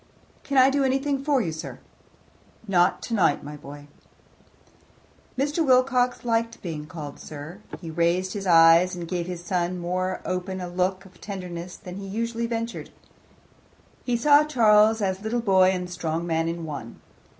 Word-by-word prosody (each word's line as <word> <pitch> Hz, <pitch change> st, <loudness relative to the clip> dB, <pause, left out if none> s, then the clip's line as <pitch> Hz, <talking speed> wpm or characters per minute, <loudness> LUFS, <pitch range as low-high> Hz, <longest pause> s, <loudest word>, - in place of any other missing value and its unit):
"Can 275 Hz, -, -2 dB
I 260 Hz, +1 st, +7 dB
do 280 Hz, 0 st, +1 dB
anything 270 Hz, +1 st, 0 dB
for 280 Hz, -3 st, +2 dB
you, 165 Hz, -, -2 dB
sir?" 155 Hz, -, -7 dB, 0.9 s
"Not 180 Hz, -1 st, +2 dB
tonight, 200 Hz, -10 st, +1 dB
my 150 Hz, +1 st, -7 dB
boy." 145 Hz, 0 st, -11 dB, 1.5 s
Mr. 290 Hz, +5 st, 0 dB
Wilcox 255 Hz, -2 st, +2 dB
liked 230 Hz, 0 st, 0 dB
being 155 Hz, -4 st, -5 dB
called 155 Hz, -4 st, -8 dB
sir. 155 Hz, +5 st, -9 dB, 0.2 s
He 165 Hz, -3 st, -7 dB
raised 170 Hz, +3 st, 0 dB
his 200 Hz, -2 st, -4 dB
eyes 165 Hz, +1 st, +6 dB
and 175 Hz, -1 st, -6 dB
gave 175 Hz, -1 st, -3 dB
his 175 Hz, -1 st, -6 dB
son 180 Hz, 0 st, -1 dB
more 185 Hz, +1 st, -2 dB
open 185 Hz, +1 st, -3 dB
a 180 Hz, -, -5 dB
look 185 Hz, +2 st, -1 dB
of 185 Hz, -2 st, -18 dB
tenderness 180 Hz, -3 st, -7 dB
than 180 Hz, 0 st, -9 dB
he 200 Hz, 0 st, -7 dB
usually 230 Hz, +3 st, -2 dB
ventured. 230 Hz, 0 st, -4 dB, 1.1 s
He 245 Hz, -2 st, 0 dB
saw 290 Hz, +4 st, +5 dB
Charles 220 Hz, -6 st, +4 dB
as 190 Hz, 0 st, -1 dB
little 220 Hz, +3 st, -1 dB
boy 190 Hz, -4 st, +4 dB
and 180 Hz, -1 st, -2 dB
strong 170 Hz, -1 st, -3 dB
man 165 Hz, -1 st, 0 dB
in 165 Hz, 0 st, -4 dB
one. 140 Hz, -7 st, -7 dB
185 Hz, 160 wpm, -25 LUFS, 170-230 Hz, 1.5 s, I